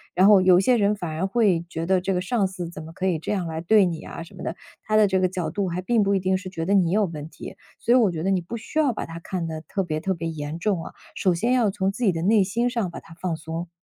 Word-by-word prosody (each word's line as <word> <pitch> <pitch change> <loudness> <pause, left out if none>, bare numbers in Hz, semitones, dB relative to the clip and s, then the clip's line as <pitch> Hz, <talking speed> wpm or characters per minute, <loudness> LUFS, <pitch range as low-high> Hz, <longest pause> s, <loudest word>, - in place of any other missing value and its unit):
然 190 +2 +5
后 200 -3 +7
有 185 -1 +6
些 245 +6 +3
人 205 0 +2
反 175 -5 -5
而 170 +5 -1
会 195 -6 +2
觉 165 0 -4
得， 185 0 +2
这 195 +1 -1
个 180 - 0
上 200 -1 +1
司 180 -3 -6
怎 155 -2 -9
么 160 - -10
可 185 +3 -4
以 165 -4 +1
这 - - -4
样 185 -5 -1
来 160 0 -4
对 200 +3 +5
你 165 -2 -3
啊 165 - -7
什 - - -15
么 - - -9
的， 165 - -3 0.3
他 215 - -1
的 210 -1 +6
这 190 -1 +1
个 185 -1 +2
角 180 -2 -3
度 200 -2 -2
还 180 +2 -3
并 220 +2 +2
不 200 0 +1
一 - - +2
定 185 0 +1
是 185 -1 -7
觉 165 -3 -4
得 200 - +1
你 180 -4 +3
有 210 0 +3
问 155 -2 -7
题。 - - -10 0.2
所 240 - +2
以 - - +7
我 215 -7 +4
觉 160 -1 -4
得 195 - +1
你 185 -2 +1
不 230 +8 -6
需 230 +8 -3
要 285 -5 +3
把 - - -4
它 165 +1 -8
看 175 0 -4
得 160 -1 -5
特 195 +4 -3
别 155 -3 -2
特 190 +2 0
别 165 -1 -4
严 155 0 -5
重 185 -3 0
啊， - - -8 0.2
首 185 -2 +2
先 235 +9 +1
要 235 -5 +3
从 195 -1 0
自 245 - -5
己 200 - +4
的 165 -1 -3
内 205 +2 +4
心 235 +5 0
上 225 -8 -2
把 - - -7
它 165 - -15
放 170 -1 -3
松。 165 +2 -6
185 Hz, 345 characters per minute, -24 LUFS, 165-205 Hz, 0.3 s, 后